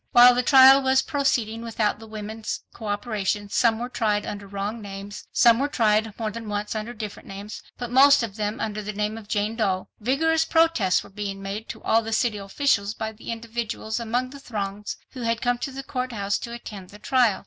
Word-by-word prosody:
While 245 +1 +9
the 245 - +2
trial 265 +1 +8
was 265 0 +3
proceeding 235 -6 0
without 225 -2 -1
the 225 - -11
women's 215 +1 -5
cooperation,—some 210 0 0
were 240 +2 -3
tried 210 -4 0
under 205 -1 -6
wrong 200 +3 -4
names, 200 0 -8
some 235 -1 +5
were 280 - +1
tried 220 -5 +2
more 220 -2 -2
than 225 0 -7
once 205 0 -2
under 220 +2 -4
different 215 -3 -7
names, 200 +2 -8 0.2
but 245 -1 -5
most 275 0 +7
of 210 -4 -5
them 210 0 -2
under 215 -1 -3
the 210 +1 -5
name 210 +1 -2
of 225 -2 -10
Jane 210 +2 -1
Doe—vigorous 255 +10 0
protests 325 - +3
were - - -15
being 200 -1 -5
made 205 +3 -5
to - - -8
all 225 - +3
the 225 0 -4
city 215 -2 +1
officials 200 0 0
by 220 0 -3
individuals 230 -1 -4
among 245 +2 -1
the 280 - -10
throngs 210 -5 -5
who 255 - -8
had 230 -1 0
come 245 0 0
to 275 - -4
the 270 +1 -6
court 255 -1 -3
house 200 -1 -1
to 235 - -7
attend 210 -5 -8
the 205 - -12
trial. 240 -3 +2
220 Hz, 200 wpm, -25 LUFS, 205-245 Hz, 0.2 s, While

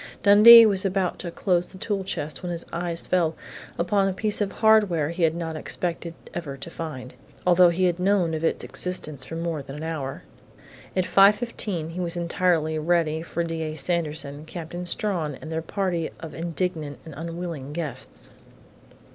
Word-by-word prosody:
Dundee 225 +3 +10
was 195 -3 +1
about 190 -2 -1
to 175 - -4
close 175 0 0
the - - -13
tool 200 0 -2
chest 155 -5 -4
when 180 -2 -4
his 170 -1 -4
eyes 170 0 -3
fell 165 -3 +1 0.4
upon 195 +3 +2
a 195 - -1
piece 210 +2 -1
of 200 - 0
hardware 205 -9 +3
he 170 +1 -5
had 165 -1 +3
not 165 -2 -4
expected 170 +1 -2 0.2
ever 150 -6 -5
to 170 - -8
find, 130 -7 -7 0.3
although 180 0 +6
he 175 +2 0
had 175 -1 +2
known 185 -3 +2
of 160 0 -3
its 165 - 0
existence 145 +1 -2
for 165 - -7
more 165 -2 -3
than 135 0 -9
an 150 - -7
hour. 150 -5 -4 0.7
At 185 - +2
5:15 200 -5 +2
he 175 - -6
was 175 -1 -1
entirely 170 -2 +1
ready 160 -1 +1
for 170 +1 -3
D. 165 -1 -4
A. 155 -1 -3
Sanderson, 150 -2 -3
Captain 175 +2 -6
Strawn 170 -6 -1
and 160 - -9
their 160 0 -2
party 175 -1 -2
of 160 -2 -8
indignant 165 -2 -3
and 160 - -9
unwilling 165 -3 -6
guests.... 150 -5 -5
170 Hz, 175 wpm, -25 LUFS, 160-185 Hz, 0.7 s, Dundee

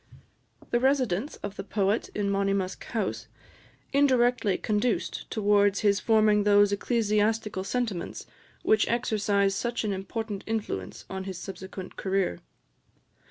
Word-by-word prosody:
The 240 - +3
residence 260 - +1
of 205 0 -5
the 195 - -4
poet 205 +2 0
in 200 -1 0
Monymusk 195 -1 -1
House 220 -5 -3 0.7
indirectly 250 -7 +3
conduced 215 +2 -1
towards 205 -2 +3
his 205 -2 +3
forming 215 -2 +4
those 205 0 +5
ecclesiastical 210 -2 0
sentiments 205 -4 -3 0.4
which 220 0 +3
exercised 205 -4 +1
such 240 -1 -2
an 210 -2 -1
important 200 +2 -4
influence 210 - -4
on 190 0 -5
his 190 -2 -5
subsequent 190 0 -8
career. 190 - 0
205 Hz, 115 wpm, -27 LUFS, 195-225 Hz, 0.7 s, those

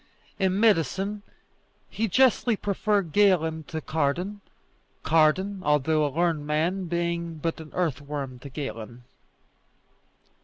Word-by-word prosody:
In 190 0 +1
medicine 200 - +2 0.7
he 225 - -2
justly 245 +2 +3
preferred 200 -3 0
Galen 160 -5 +2
to 160 -2 -5
Cardan; 170 +8 -1 0.6
Cardan, 175 +5 +2
although 150 +1 +2
a 145 - +1
learned 160 0 0
man, 170 +5 0
being 170 -1 -2
but 165 +2 -3
an 155 - -11
earthworm 145 -5 -3
to 140 - -9
Galen. 125 -4 -7
165 Hz, 110 wpm, -26 LUFS, 150-195 Hz, 0.7 s, justly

